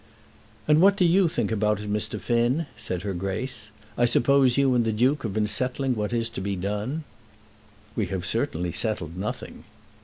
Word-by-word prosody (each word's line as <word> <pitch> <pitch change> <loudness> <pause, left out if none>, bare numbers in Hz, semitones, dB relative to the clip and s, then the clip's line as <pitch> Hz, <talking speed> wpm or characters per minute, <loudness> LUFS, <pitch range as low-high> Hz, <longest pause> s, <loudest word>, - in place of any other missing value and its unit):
"And 155 +1 +5
what 195 +1 +6
do 180 - +4
you 180 +2 +4
think 120 -8 -1
about 105 -1 +1
it, 105 - -6
Mr. 105 - -2
Finn?" 120 +7 +1
said 90 0 -4
her 100 -2 -2
Grace. 105 +6 -3 0.3
"I 120 - +3
suppose 130 +1 +3
you 135 -2 +4
and 120 -1 +3
the 115 - 0
Duke 125 +7 +2
have 110 -4 -3
been 110 -1 +2
settling 130 +4 +1
what 105 0 -2
is 115 -1 0
to 115 - -5
be 100 +1 -2
done." 105 - -3 0.9
"We - - 0
have 90 -1 -3
certainly 90 0 -1
settled 85 -4 -3
nothing." 95 +3 -5
115 Hz, 185 wpm, -25 LUFS, 100-130 Hz, 0.9 s, what